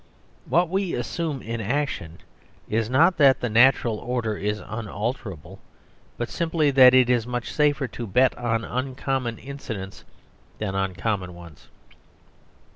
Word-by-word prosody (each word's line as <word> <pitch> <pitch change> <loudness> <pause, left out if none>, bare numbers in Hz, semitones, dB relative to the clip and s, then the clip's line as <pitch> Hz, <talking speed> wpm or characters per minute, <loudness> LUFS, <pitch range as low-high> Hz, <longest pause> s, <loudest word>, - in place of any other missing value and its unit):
What 175 +1 +3
we 190 +1 -1
assume 145 +3 -3
in 115 0 -4
action 110 - -2 0.5
is 110 0 -1
not 165 +8 +4
that 135 -5 +5
the 125 - -2
natural 120 -2 +4
order 120 -3 -2
is 105 +1 -2
unalterable, 105 - -5 0.6
but 120 - -2
simply 160 -3 0
that 130 -1 +7
it 130 -1 +6
is 120 -2 +1
much 125 -1 -4
safer 145 -2 +2
to 120 +1 -6
bet 125 +7 +3
on 115 -2 -1
uncommon 130 -1 -2
incidents 110 -8 -7 0.5
than 105 -3 -3
on 95 -1 -1
common 95 -4 -2
ones. 85 -3 -14
120 Hz, 135 wpm, -24 LUFS, 105-135 Hz, 0.6 s, that